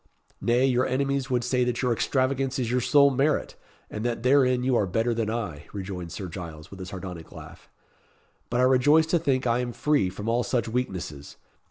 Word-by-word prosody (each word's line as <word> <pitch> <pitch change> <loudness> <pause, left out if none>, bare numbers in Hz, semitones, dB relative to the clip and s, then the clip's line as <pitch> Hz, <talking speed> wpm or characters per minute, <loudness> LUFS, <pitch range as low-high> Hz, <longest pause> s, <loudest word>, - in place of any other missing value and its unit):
"Nay, 120 +2 +3
your 125 -1 +2
enemies 140 +1 -1
would 125 -2 +1
say 125 +1 +1
that 125 +1 -1
your 125 -1 +2
extravagance 130 +2 0
is 120 -3 -1
your 125 0 +1
sole 140 +2 +5
merit, 140 +3 0 0.3
and 105 - -6
that 120 -1 -2
therein 130 -1 +3
you 130 -1 +2
are 105 - +2
better 115 +6 0
than 115 -2 -1
I," 105 -11 -4
rejoined 90 -4 -6
Sir 95 - -5
Giles, 80 -3 -9
with 95 -1 -9
a 90 - -6
sardonic 90 -4 -8
laugh. - - -12 0.8
"But 120 +1 +1
I - - +4
rejoice 130 +5 +5
to 170 +2 +1
think 135 -5 0
I 120 0 +2
am 125 -1 -3
free 145 -11 +1
from 100 +4 -7
all 115 +2 +2
such 120 -2 -1
weaknesses. 95 - -4
120 Hz, 200 wpm, -26 LUFS, 100-130 Hz, 0.8 s, sole